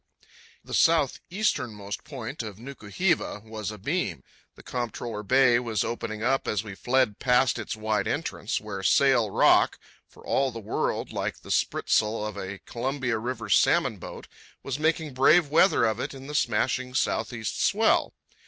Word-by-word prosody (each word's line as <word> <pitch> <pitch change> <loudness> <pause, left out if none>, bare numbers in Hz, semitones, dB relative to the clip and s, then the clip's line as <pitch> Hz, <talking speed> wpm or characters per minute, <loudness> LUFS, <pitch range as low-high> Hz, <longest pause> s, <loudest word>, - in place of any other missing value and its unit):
Cape - - -34
Martin, - - -25
the 165 +3 +1
southeasternmost 105 - -2
point 135 -3 -6
of 105 -4 -7
Nuku 120 -3 -10
hiva, 175 - 0
was 110 -2 -5
abeam, 105 - -3 0.3
and - - -15
Comptroller 120 -2 -4
Bay 125 +2 +4
was 115 -4 -1
opening 110 -2 -4
up 135 +3 +1
as 105 0 0
we 105 -2 -8
fled 125 0 +1
past 125 -1 +3
its - - -4
wide 110 -2 -1
entrance, - - -2
where 105 -2 -6
Sail 125 +2 +4
Rock, - - +4 0.3
for - - -18
all 135 0 +1
the 115 - -7
world 105 - -2
like - - -3
the - - -8
spritsail 105 0 +1
of 105 - -5
a 95 +1 -6
Columbia 125 -1 -2
River 115 -1 -4
salmon 100 - +3
boat, - - -9 0.4
was 135 +1 -4
making 160 -2 0
brave 145 +5 +5
weather 160 -4 +4
of 110 0 0
it 130 - -4
in 135 0 -10
the 150 - -7
smashing 125 0 0
southeast 115 -4 -1
swell. - - +2
120 Hz, 160 wpm, -26 LUFS, 110-135 Hz, 0.4 s, brave